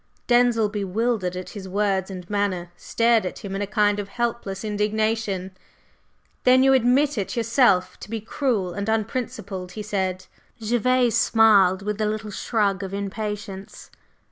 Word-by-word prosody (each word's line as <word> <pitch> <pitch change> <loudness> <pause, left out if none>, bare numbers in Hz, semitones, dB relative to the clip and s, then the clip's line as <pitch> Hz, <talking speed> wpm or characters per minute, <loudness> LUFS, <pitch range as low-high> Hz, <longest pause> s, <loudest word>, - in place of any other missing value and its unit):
Denzil, 240 -3 +3
bewildered 205 -1 -1
at 185 0 -6
his 195 -3 -8
words 195 -1 0
and 180 -2 -8
manner, 190 -4 -2
stared 230 +4 +2
at 185 - -6
him 195 0 -4
in 195 - -3
a 205 - -2
kind 205 -1 +2
of 205 - -4
helpless 235 -4 -3
indignation. 210 -2 -1 0.9
"Then 255 +1 +5
you 270 0 +5
admit 255 -2 +2
yourself 230 -5 +2
to - - -10
be 225 0 -3
cruel 220 -5 -1
and 200 +3 -3
unprincipled?" 215 -4 -3
he 215 - -6
said. 190 -3 -2 0.3
Gervase 240 +2 +2
smiled, 200 -4 +4
with 210 +1 -3
a 215 - +2
little 215 0 -3
shrug 205 -2 0
of 195 0 -5
impatience. 200 -1 -6
210 Hz, 145 wpm, -23 LUFS, 195-230 Hz, 0.9 s, Then